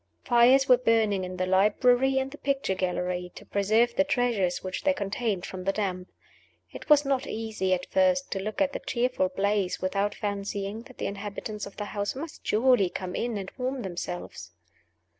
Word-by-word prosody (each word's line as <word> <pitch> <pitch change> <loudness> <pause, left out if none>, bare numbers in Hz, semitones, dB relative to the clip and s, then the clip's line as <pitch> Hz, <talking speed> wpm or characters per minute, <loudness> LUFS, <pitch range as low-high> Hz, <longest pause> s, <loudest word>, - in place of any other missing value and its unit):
Fires 255 +3 +5
were 250 -1 +6
burning 220 -5 +2
in 185 0 -6
the 185 - 0
library 245 +8 +3
and 265 0 -1
the 295 - -10
picture 275 -7 0
gallery, 180 -1 -2
to - - -11
preserve 220 +4 +2
the - - +4
treasures 240 -10 0
which 185 0 -4
they 285 - +3
contained 200 -3 -2
from 185 -1 -7
the 195 - +1
damp. 185 -3 -3 0.6
It - - -10
was 295 -1 +6
not 270 -2 0
easy, 215 -4 -2
at 180 - -6
first, 275 -1 +2
to 195 - -2
look 215 +8 -4
at 285 -1 +2
the - - -3
cheerful 240 -6 0
blaze 195 0 0
without 200 +2 -1
fancying 200 +1 -3
that 260 - -16
the - - -3
inhabitants 205 +1 -5
of 200 - -14
the 210 - -3
house 205 +1 -3
must 300 +3 -8
surely 225 -4 +4
come 180 0 -5
in 235 -2 -2
and 190 -1 -6
warm 255 0 -2
themselves. 175 -1 -6
210 Hz, 185 wpm, -27 LUFS, 190-250 Hz, 0.6 s, were